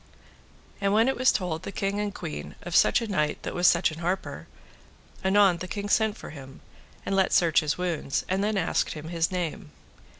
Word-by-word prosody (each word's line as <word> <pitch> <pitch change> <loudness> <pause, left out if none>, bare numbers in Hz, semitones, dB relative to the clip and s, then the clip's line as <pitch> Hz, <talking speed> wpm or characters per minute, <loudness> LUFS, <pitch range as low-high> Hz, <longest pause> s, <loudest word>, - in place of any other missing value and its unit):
And 200 0 +2
when 225 +3 +4
it 265 - +1
was 255 +1 +4
told 170 -4 -2
the - - -6
king 200 +1 -2
and 210 -1 -1
the - - -11
queen 75 0 -6
of 175 -1 -4
such - - +5
a - - -4
knight 150 -7 -1
that - - -4
was 175 0 +3
such 170 - +4
an 155 - -8
harper, 180 +3 -3 0.8
anon 190 -2 +4
the 185 - -6
king 205 0 -4
sent 220 0 +2
for - - -9
him, 135 -3 -11 0.4
and 195 - -1
let 190 -1 +2
search 170 -2 +4
his 150 -3 -1
wounds, 170 -6 -2
and 190 +2 0
then 210 0 0
asked - - 0
him 155 0 -8
his 165 0 0
name. 180 -1 -3
180 Hz, 210 wpm, -26 LUFS, 160-200 Hz, 0.8 s, such